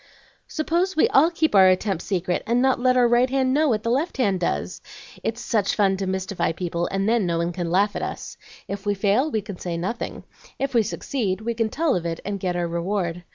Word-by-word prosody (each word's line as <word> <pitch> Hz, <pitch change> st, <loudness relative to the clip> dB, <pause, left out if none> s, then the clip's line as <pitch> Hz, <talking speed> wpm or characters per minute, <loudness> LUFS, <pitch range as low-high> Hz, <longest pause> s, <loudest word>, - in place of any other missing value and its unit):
"Suppose 340 Hz, +4 st, -1 dB
we 310 Hz, -, +4 dB
all 305 Hz, +5 st, +5 dB
keep 325 Hz, -2 st, 0 dB
our 190 Hz, -2 st, +7 dB
attempts 185 Hz, -1 st, +1 dB
secret, 180 Hz, -2 st, -1 dB
and 235 Hz, +2 st, +2 dB
not 260 Hz, 0 st, +2 dB
let 255 Hz, 0 st, +3 dB
our 245 Hz, -1 st, +5 dB
right 240 Hz, +2 st, +3 dB
hand 260 Hz, -1 st, +1 dB
know 305 Hz, +1 st, +3 dB
what 215 Hz, -3 st, 0 dB
the 230 Hz, -, 0 dB
left 290 Hz, +7 st, -1 dB
hand 200 Hz, -8 st, +1 dB
does? 170 Hz, -, -2 dB, 0.4 s
It's 230 Hz, +1 st, -3 dB
such 215 Hz, -4 st, 0 dB
fun 195 Hz, -2 st, +3 dB
to 190 Hz, 0 st, -3 dB
mystify 190 Hz, -2 st, -1 dB
people, 170 Hz, 0 st, -2 dB
and 195 Hz, +1 st, -1 dB
then 225 Hz, -4 st, +2 dB
no 170 Hz, -1 st, 0 dB
one 170 Hz, +1 st, -1 dB
can 175 Hz, -1 st, -3 dB
laugh 200 Hz, +4 st, +2 dB
at -, -, -3 dB
us. -, -, -5 dB, 0.3 s
If 200 Hz, 0 st, -5 dB
we 205 Hz, -1 st, 0 dB
fail, 205 Hz, +9 st, +2 dB
we 220 Hz, -7 st, -1 dB
can 200 Hz, -4 st, -8 dB
say 170 Hz, -2 st, -4 dB
nothing; 190 Hz, +8 st, -4 dB, 0.3 s
if 275 Hz, 0 st, -2 dB
we 235 Hz, -, +5 dB
succeed, 210 Hz, -2 st, -2 dB
we 235 Hz, +2 st, -2 dB
can 225 Hz, -1 st, -1 dB
tell 315 Hz, +3 st, +1 dB
of 170 Hz, -1 st, -2 dB
it 165 Hz, 0 st, -4 dB
and 200 Hz, 0 st, -3 dB
get 180 Hz, -1 st, -2 dB
our 175 Hz, -1 st, -1 dB
reward. 175 Hz, 0 st, -2 dB
205 Hz, 235 wpm, -23 LUFS, 185-250 Hz, 0.4 s, our